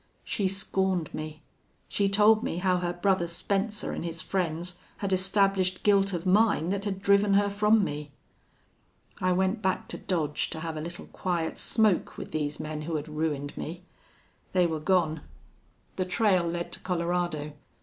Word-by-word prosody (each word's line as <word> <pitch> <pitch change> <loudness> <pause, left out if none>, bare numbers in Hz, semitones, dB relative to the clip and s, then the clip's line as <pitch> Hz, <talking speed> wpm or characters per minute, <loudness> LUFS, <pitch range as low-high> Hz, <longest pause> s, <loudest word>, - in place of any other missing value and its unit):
She 200 - -1
scorned 190 -3 0
me. 155 0 -6 0.4
She 200 -1 +1
told 215 +2 +5
me 170 - -2
how 180 0 +2
her 175 -1 -1
brother 175 0 +1
Spencer 200 +5 -2
an' - - -4
his 165 -1 -5
friends 175 -1 -2 0.2
had 195 -2 -1
established 190 -1 +2
guilt 200 -1 +4
of 175 -1 -3
mine 190 -3 +3
that 200 +1 -1
had 195 -1 -3
driven 200 0 +4
her 200 0 +3
from 210 +1 +4
me. 150 -3 -4 1.1
"I 185 - +2
went 190 +4 +1
back 190 -2 0
to - - -5
Dodge 155 -6 -1
to 160 - -5
have 165 -1 -4
a 155 - -4
little 170 +2 -7
quiet 170 -3 -2
smoke 215 -5 +2
with - - -7
these 150 -1 -2
men 155 0 -4
who 160 +1 -3
had 150 0 -3
ruined 150 -2 -2
me. 175 +3 -6 0.7
They 180 -1 +4
were 160 -2 -1
gone. 160 -2 +1 0.8
The 185 - 0
trail 185 -2 +2
led 170 0 -3
to - - -5
Colorado. 170 -4 -1
180 Hz, 170 wpm, -28 LUFS, 160-195 Hz, 1.1 s, told